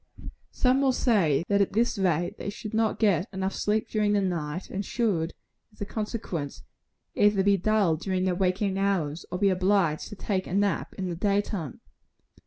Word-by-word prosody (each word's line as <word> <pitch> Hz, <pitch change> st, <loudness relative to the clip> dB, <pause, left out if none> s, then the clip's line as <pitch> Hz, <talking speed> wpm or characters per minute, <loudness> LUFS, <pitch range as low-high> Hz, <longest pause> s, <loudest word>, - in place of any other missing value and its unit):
Some 255 Hz, +1 st, +2 dB
will 270 Hz, -2 st, +3 dB
say, 180 Hz, -, +2 dB
that 200 Hz, 0 st, +3 dB
at 195 Hz, -, 0 dB
this 230 Hz, 0 st, +1 dB
rate 175 Hz, -2 st, 0 dB
they -, -, -4 dB
should 215 Hz, +1 st, -7 dB
not 220 Hz, 0 st, +1 dB
get 200 Hz, -3 st, +2 dB, 0.2 s
sleep 215 Hz, +1 st, 0 dB
enough -, -, -29 dB
during 210 Hz, -1 st, +1 dB
the 205 Hz, -, +3 dB
night; 170 Hz, -3 st, -3 dB
and 200 Hz, +1 st, -4 dB
should, 200 Hz, -8 st, -1 dB, 0.4 s
as 210 Hz, -, -25 dB
a 205 Hz, -, -3 dB
consequence, 205 Hz, -, -4 dB, 0.5 s
either 205 Hz, -2 st, +3 dB
be 200 Hz, 0 st, +4 dB
dull 195 Hz, -4 st, +2 dB
during 185 Hz, +2 st, -1 dB
their 185 Hz, -1 st, +1 dB
waking 190 Hz, +1 st, 0 dB
hours, 180 Hz, -6 st, -1 dB
or 180 Hz, -, -2 dB
be 200 Hz, +1 st, +3 dB
obliged 185 Hz, -4 st, +1 dB
to -, -, -9 dB
take 190 Hz, -2 st, -2 dB
a 180 Hz, -, -3 dB
nap 200 Hz, 0 st, 0 dB
in 190 Hz, -, -3 dB
the 175 Hz, -, -3 dB
day 200 Hz, +3 st, +1 dB
time. 180 Hz, -, -5 dB
195 Hz, 190 wpm, -27 LUFS, 180-210 Hz, 0.5 s, be